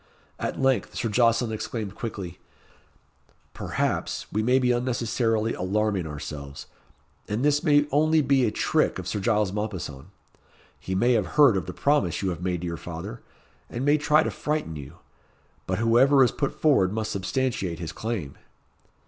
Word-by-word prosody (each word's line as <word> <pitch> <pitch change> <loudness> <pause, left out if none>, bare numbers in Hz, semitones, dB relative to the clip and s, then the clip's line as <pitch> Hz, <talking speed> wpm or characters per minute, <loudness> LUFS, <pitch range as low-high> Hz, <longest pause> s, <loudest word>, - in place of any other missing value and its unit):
At - - -3
length 135 -1 +1
Sir 115 - -1
Jocelyn 115 +1 +2
exclaimed 110 -2 -4
quickly, 95 -6 -6 1.1
"Perhaps, - - -2
we 105 - 0
may 125 +4 +3
be 125 -1 +2
unnecessarily 115 -2 0
alarming 100 -1 -1
ourselves, 70 -1 -7 0.6
and 110 +6 -1
this 145 +1 +2
may 145 -3 +4
only 155 +2 +3
be 140 -2 +3
a 115 - +3
trick - - +1
of - - -6
Sir 105 - -2
Giles 105 -1 +1
Mompesson. 95 -9 -5 0.7
He 95 - -4
may 120 +6 +3
have 110 +3 -1
heard 140 -8 +7
of 95 -5 -2
the - - -3
promise 140 - +1
you 95 - 0
have 85 -1 -6
made 90 -2 -2
to - - -4
your 85 -1 -4
father, 90 +9 -7 0.5
and 120 +3 -3
may 145 +1 +4
try 150 +1 +4
to - - -2
frighten 150 - -2
you. 70 -3 -9 0.7
But 95 - -1
whoever 125 +5 +5
is 125 - +3
put 140 - -3
forward 135 -12 +3
must 110 0 -2
substantiate 100 -3 -2
his 80 -3 -5
claim." 95 - -5
110 Hz, 165 wpm, -26 LUFS, 95-130 Hz, 1.1 s, heard